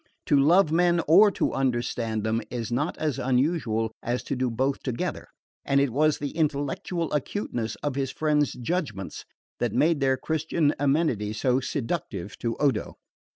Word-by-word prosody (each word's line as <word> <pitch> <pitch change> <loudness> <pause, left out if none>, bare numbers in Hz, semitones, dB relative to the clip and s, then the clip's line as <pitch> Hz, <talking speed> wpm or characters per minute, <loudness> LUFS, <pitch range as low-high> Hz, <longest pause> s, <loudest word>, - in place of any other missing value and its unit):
To - - +3
love 165 +4 +5
men, 175 +1 +3
or 195 +7 +7
to - - 0
understand 120 -4 -1
them, 110 +1 0
is 120 -2 -4
not 145 +7 -1
as 150 -4 -1
unusual 125 -4 0
as 120 +1 -2
to - - -3
do 130 0 0
both 130 +4 -1
together; 125 -3 -3 0.4
and 140 - +2
it 140 -2 +2
was 150 +4 +2
the 145 -1 -4
intellectual 155 +2 -2
acuteness 135 - -2
of 145 -2 -1
his 135 -1 -1
friend's 150 -1 +1
judgments 125 - -4 0.3
that - - -1
made 160 -1 +3
their 135 -1 +2
Christian 160 0 0
amenity 140 -8 +1
so 125 +4 +1
seductive 120 - -4
to 115 -1 -2
Odo. 135 -8 0
135 Hz, 155 wpm, -26 LUFS, 120-155 Hz, 0.4 s, or